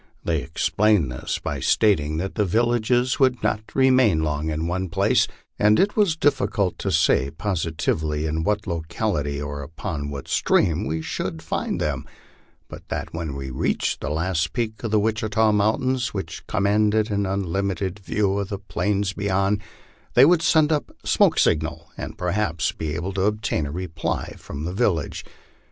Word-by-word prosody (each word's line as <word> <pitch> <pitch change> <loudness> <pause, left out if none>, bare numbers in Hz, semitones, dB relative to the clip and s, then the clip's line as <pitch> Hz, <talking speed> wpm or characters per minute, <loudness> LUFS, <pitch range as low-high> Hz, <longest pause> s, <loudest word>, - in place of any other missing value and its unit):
They 80 -3 0
explained 80 +2 +1
this 65 - -3
by - - -4
stating 80 -8 +2
that 95 +4 -3
the 105 - +1
villages 120 +4 +1
would 130 -4 +2
not 110 0 +1
remain 130 -11 +4
long 75 0 -1
in 80 +1 -2
one 90 +2 -2
place, - - +3 0.3
and 105 +1 +5
it 205 +1 +2
was 200 -7 +3
difficult 135 - +1
to - - -1
say 65 - +3
positively 80 -3 -1
in 80 +1 -1
what 105 +3 0
lo 85 -4 -2
cality 75 -9 -1
or 70 0 -5
upon 75 0 -5
what 70 -2 -6
stream 85 +6 +2
we 80 0 -2
should 80 +1 -4
find 80 - -2
them; - - -2 0.6
but - - -11
that - - -4
when 80 -4 -4
we 70 -1 -5
reached 65 - -1
the 65 - -3
last 80 +1 -1
peak 110 -2 -3
of 115 - -1
the 105 0 +3
Witchita 110 0 +1
mountains, 110 +3 +1
which 80 -4 -5
commanded 105 +2 +2
an 100 -1 0
unlimited 95 0 -2
view 100 0 0
of 100 -1 -3
the 100 - -3
plains 100 -1 -1
beyond, 100 +1 0 0.5
they 125 - +8
would 170 +1 +4
send 160 -2 +4
up 150 -2 0 0.2
signal - - +4
smoke, 80 +1 -1
and 110 - -7
perhaps 90 -3 0
be 80 -1 -4
able 90 +3 -3
to 95 - -1
obtain 105 -7 0
a - - -6
reply 85 -1 -3
from 70 - -7
the 90 +3 -3
village. 95 -8 0
95 Hz, 170 wpm, -23 LUFS, 80-105 Hz, 0.6 s, they